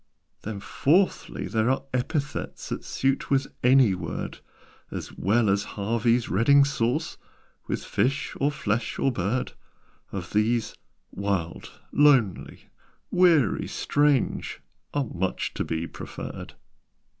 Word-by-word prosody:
"Then 105 -1 -5
fourthly, 165 - +1
there 110 +1 +1
are 130 - +1
epithets 140 +3 -3
That - - -4
suit 135 0 -1
with 135 -1 +2 0.2
any 125 -4 +6
word 90 - -5 0.5
As - - -6
well 110 +4 +2
as 100 +1 +2
Harvey's 115 +3 +1
Reading 140 +8 +5
Sauce 135 +2 -1 0.5
With - - -2
fish, 130 +8 -1
or 140 - +3
flesh, 115 -6 -2
or 135 - +2
bird 115 +3 -1 0.6
Of 90 -3 -6
these, 110 +2 +1 0.4
'wild,' 95 -4 -3
'lonely,' 135 -10 +2 0.4
'weary,' 175 -7 +4
'strange,' 145 -3 +1 0.3
Are 145 -2 0
much 95 -4 -2
to - - -2
be 80 0 -2
preferred." - - -8
120 Hz, 115 wpm, -26 LUFS, 100-140 Hz, 0.6 s, any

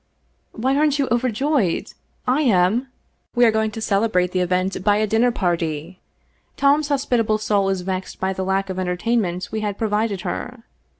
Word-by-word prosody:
" - - -44
Why, 260 +4 0
aren't 295 0 +2
you 280 -2 +1
overjoyed? 245 - 0 0.3
I 255 +4 +2
am. 220 0 +2 0.5
We 240 0 +5
are 225 - +5
going 220 0 +1
to 215 - -7
celebrate 195 -4 +1
the 185 - 0
event 180 +1 0
by 205 0 +4
a 215 - +2
dinner 225 +3 +2
party. 170 -3 -2 0.6
Tom's 285 +2 +3
hospitable 245 -6 +1
soul 205 -2 +1
is 190 -2 -1
vexed 185 0 -4
by 190 0 -1
the 190 - -3
lack 190 0 -1
of 185 - -4
entertainment 185 0 -1
we 220 - -2
had 205 -2 -3
pro 220 - -1
vided 210 -2 0
her. 245 +4 -5
210 Hz, 180 wpm, -21 LUFS, 185-240 Hz, 0.6 s, We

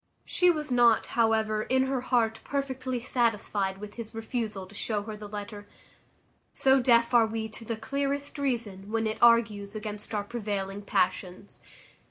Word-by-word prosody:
She 360 - +3
was 305 -4 0
not, 240 -2 +5
however, 220 -2 +2
in 260 +4 +2
her 265 -1 -1
heart 230 -3 +1
perfectly 260 -3 -3
satisfied 210 -6 0
with 210 +2 -10
his 225 -1 -7
refusal 225 -4 -3
to 190 - -16
show 205 0 -2
her 215 0 -6
the 210 -1 -9
letter; 205 0 -7 0.9
so 265 0 +4
deaf 235 -1 +4
are 230 -2 +6
we 220 0 -3
to 225 +1 -9
the 230 0 -3
clearest 280 +4 -3
reason, 225 -8 -2
when 225 0 0
it 220 0 -2
argues 225 -3 +4
against 215 0 -5
our 205 - 0
prevailing 205 -3 -4
passions. 185 0 -2
225 Hz, 160 wpm, -28 LUFS, 205-245 Hz, 0.9 s, are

